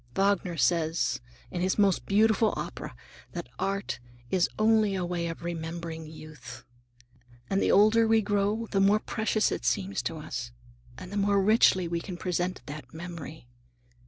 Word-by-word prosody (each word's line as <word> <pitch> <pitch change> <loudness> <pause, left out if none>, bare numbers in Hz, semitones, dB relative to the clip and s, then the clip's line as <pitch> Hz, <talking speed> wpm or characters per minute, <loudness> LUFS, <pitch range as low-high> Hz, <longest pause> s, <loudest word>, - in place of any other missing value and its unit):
Wagner 195 -3 +1
says, 160 +1 +1 0.3
in 175 - -3
his 185 +1 +1
most 200 -3 +2
beautiful 220 +2 +3
opera, - - -6 0.4
that - - -5
art 195 0 -2 0.3
is 185 -2 +2
only 215 -2 +3
a 185 -2 -1
way 175 -1 -2
of 165 0 -6
remembering 165 -1 -5
youth. 155 -3 -11 0.9
And 195 - +2
the - - +3
older 215 +3 +5
we 220 -1 +4
grow 205 +2 0
the 195 - +2
more 200 +2 +5
precious 220 0 0
it - - -3
seems 195 0 0
to 165 - -4
us, 120 -6 -6 0.4
and 185 +4 -9
the 205 - -3
more 200 0 +3
richly 195 -3 +4
we 170 0 -1
can 180 0 -7
present 180 0 -2
that 145 -3 -8
memory. 165 -3 -8
185 Hz, 160 wpm, -28 LUFS, 165-205 Hz, 0.9 s, older